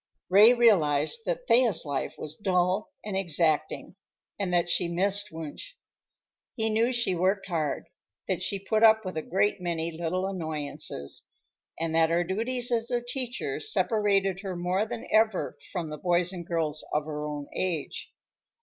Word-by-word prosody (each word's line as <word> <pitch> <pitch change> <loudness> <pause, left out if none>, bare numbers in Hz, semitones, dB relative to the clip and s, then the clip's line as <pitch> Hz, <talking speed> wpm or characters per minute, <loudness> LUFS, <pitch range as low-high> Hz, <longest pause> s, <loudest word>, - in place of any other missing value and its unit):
Ray 205 +5 +8
realized 175 -4 +4
that 180 +8 -2
Thea's 230 -7 +4
life 140 -2 -3
was 150 - -6
dull 185 +1 +1 0.2
and 210 -2 -3
exacting, 165 -1 0 0.4
and 195 -3 -1
that 175 -1 +2
she 175 0 +1
missed 200 +4 0
Wunsch. 160 - -7 0.8
He 220 -2 0
knew 230 +3 +2
she 235 -6 +1
worked 190 +3 +1
hard, 160 -6 -2 0.4
that 185 -3 -1
she 190 +2 -1
put 215 +3 -1
up 220 -1 +6
with 185 - -5
a 155 - -1
great 195 +3 0
many 170 -1 -2
little 170 +3 -2
annoyances, 155 - -4 0.6
and 165 -1 -1
that 160 0 +4
her 170 +1 +2
duties 240 +7 -2
as 230 -1 0
a 245 -1 +1
teacher 265 - -3
separated 200 - +1
her 195 -2 -5
more 180 +4 0
than 235 0 -6
ever 220 -3 +2 0.2
from 175 -5 -3
the 150 -1 -7
boys 175 0 +1
and 170 -2 -7
girls 155 -3 -1
of 150 0 0
her 150 -1 -4
own 145 -1 -5
age. 170 -6 -3
185 Hz, 160 wpm, -27 LUFS, 165-215 Hz, 0.8 s, Ray